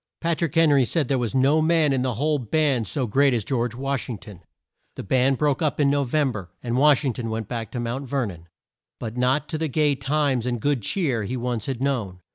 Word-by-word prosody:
Pat 170 -1 -1
rick 170 +1 -1
Hen 165 -2 +5
ry 140 -2 +5
said 145 +3 0
there 135 -2 +1
was 120 +1 -2
no 140 +4 +4
man 160 -3 +3
in 130 - 0
the 125 -2 -1
whole 150 +4 0
band 135 -1 0
so 135 -4 0
great 135 +4 +3
as 110 -4 -2
George 120 -3 -1
Wash 135 +1 -3
ing 115 - -4
ton. 100 -3 -13 0.5
The - - -6
band 130 +5 +2
broke 145 0 +1
up 155 -2 0
in 140 -1 +3
No 145 0 +2
vem 140 +1 +1
ber, 100 -6 -7
and 120 -1 -2
Wash 145 +2 +4
ing 130 - 0
ton 115 0 -5
went 110 -1 -3
back 115 -2 -4
to 125 - -5
Mount 120 +4 -3
Ver 135 -1 0
non. 85 -5 -9 0.5
But 115 -1 -5
not 130 +4 +1
to 155 - -3
the 160 - 0
gay 150 +1 +2
times 135 -2 0
and 120 -1 -1
good 140 +1 0
cheer 135 - 0
he 125 +5 -3
once 120 -2 -3
had 130 -1 -3
known. 110 -10 -2
130 Hz, 250 wpm, -24 LUFS, 120-145 Hz, 0.5 s, Hen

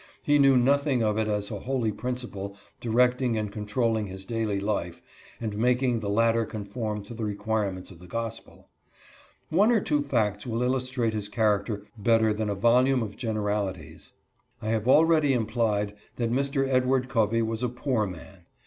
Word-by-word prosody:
He 145 0 +3
knew 135 -2 +6
nothing 135 0 +2
of 105 0 +1
it 110 - 0
as 105 0 -2
a 105 - -4
holy 125 -1 -1
principle 105 -5 -5 0.2
directing 125 +1 +2
and 105 -1 -2
controlling 110 +1 -1
his 95 0 -9
daily 110 -2 -1
life 100 -4 -2 0.4
and 110 -3 -4
making 125 +1 +2
the 105 -2 -4
latter 115 +2 +3
conform 105 0 -4
to 105 - -10
the 115 -1 -5
require 105 0 -1
ments 95 0 -9
of 85 - -14
the 90 - -13
gospel. 115 +3 -6 0.8
One 200 +8 +4
or 230 - +4
two 155 -8 0
facts 110 -6 -1
will 115 +1 -1
illustrate 125 -2 0
his 105 -1 -4
character 105 -1 0
better 110 0 +3
than 105 0 -2
a 100 - -1
volume 125 +4 +3
of 100 -2 -6
generalities. 105 -6 -3 0.5
I 110 - -4
have 110 0 0
already 155 0 +5
implied 110 -3 0 0.2
that 115 -1 -1
Mr. 135 +1 +1
Edward 130 0 +2
Covey 115 -1 +1
was 110 0 -3
a 125 - 0
poor 125 -3 -1
man. 90 0 -11
115 Hz, 170 wpm, -27 LUFS, 105-125 Hz, 0.8 s, knew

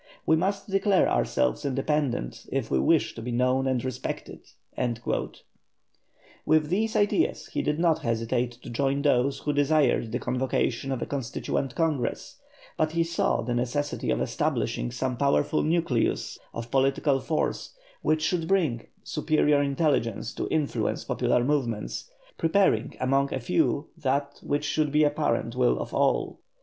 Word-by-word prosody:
We 160 - +4
must 195 +4 -1
declare 195 -1 +3
ourselves - - +1
independent 135 - -1
if - - -2
we 65 - +3
wish 65 - +2
to - - -8
be 120 +2 -4
known 130 +2 +1
and 130 -1 0
respected." 130 -3 -5 2.0
With 155 -1 +3
these 220 +5 0
ideas 210 +10 +1
he - - 0
did 150 - 0
not 165 -1 +2
hesitate 120 +1 -1
to 130 - -8
join 140 +3 0
those 140 -1 +2
who 150 - -2
desired 145 -5 +2
the 120 - 0
convocation 130 0 -1
of 130 -3 -2
a - - -3
Constituent 135 0 -3
Congress, 160 - -1 0.4
but 155 0 +1
he 165 0 +2
saw 170 +1 0
the 120 +1 -2
necessity 125 +5 -1
of - - +1
establishing - - -1
some 125 - -2
powerful 140 +2 +2
nucleus 160 -7 0
of 115 0 -7
political 135 +1 +2
force 155 +3 -2 0.3
which 155 0 +1
should 165 0 0
bring 160 -12 +1 0.2
superior 150 -2 +2
intelligence 140 -6 0
to - - -3
influence 155 -3 -1
popular 120 - +1
movements, 130 - -2 0.3
preparing 190 +4 +2
among 135 +2 +1
a - - -1
few 125 - 0
that 140 -1 -1
which 145 +1 -1
should 150 0 0
be 150 +1 +3
the - - +5
apparent 145 -5 0
will 125 -1 +3
of - - -5
all. - - +1
140 Hz, 150 wpm, -27 LUFS, 125-155 Hz, 2.0 s, the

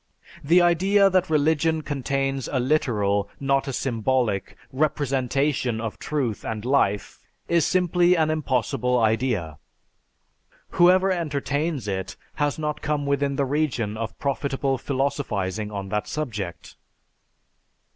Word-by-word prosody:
The 170 +5 +5
idea 195 +4 +4
that 185 -1 +2
religion 160 +1 +2
contains 135 -2 -2
a 130 - +1
literal, 105 -7 +1
not 135 0 +1
a - - -2
symbolic, 120 -4 -1 0.2
representation 135 -3 0
of 115 -1 -5
truth 130 -8 -2
and 110 0 -4
life 115 -7 +1 0.3
is 170 -2 +2
simply 180 0 +3
an 160 -2 +2
impossible 130 -4 0
idea. 110 -9 0 1.1
Whoever 185 +2 +5
entertains 150 - -2
it 95 -2 -3 0.3
has 145 -1 +1
not 150 -1 -3
come 150 -1 -1
within 140 0 0
the 140 0 +1
region 130 -7 -1
of 110 0 -5
profitable 135 -1 -1
philosophizing 120 -8 -2
on 100 -2 -5
that 105 +1 -2
subject." 100 - -5
135 Hz, 115 wpm, -24 LUFS, 115-155 Hz, 1.1 s, The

